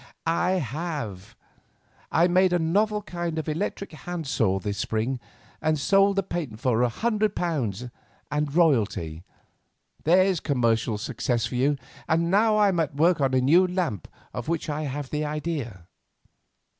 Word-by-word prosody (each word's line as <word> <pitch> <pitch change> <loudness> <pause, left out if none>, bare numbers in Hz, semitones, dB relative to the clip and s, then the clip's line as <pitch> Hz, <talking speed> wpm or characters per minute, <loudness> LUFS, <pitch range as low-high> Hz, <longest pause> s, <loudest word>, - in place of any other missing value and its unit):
"I 170 +3 +1
have. 140 - -4 0.8
I 170 +2 +4
made 185 0 +3
a - - +4
novel 210 +6 +1
kind 175 -4 -4
of 160 - -3
electrical 165 +1 -3
hand 175 -2 -5
saw 95 -8 +1
this 100 +1 -4
spring, 115 +5 -1 0.4
and 155 -1 +1
sold 195 +6 +3
the 195 - +1
patent 150 - -4
for 125 -3 +1
£100 150 - -1 0.4
and 150 +1 0
a - - -8
royalty. 110 - +1 0.8
There's 185 +2 +4
commercial 115 -6 +1
success 115 +2 -1
for 115 - -5
you, 135 +4 +2 0.3
and 170 +1 +2
now 215 +2 +4
I 205 -1 +5
am 180 -3 0
at 150 -3 -1
work 165 +1 +3
on 135 -1 +2
a 130 - +3
new 170 +8 +5
lamp 175 - -2 0.3
of 120 - -5
which 165 -1 -1
I 150 +1 -3
have 140 -1 -5
the 150 0 -1
idea." 150 - -4
155 Hz, 155 wpm, -26 LUFS, 125-175 Hz, 0.8 s, I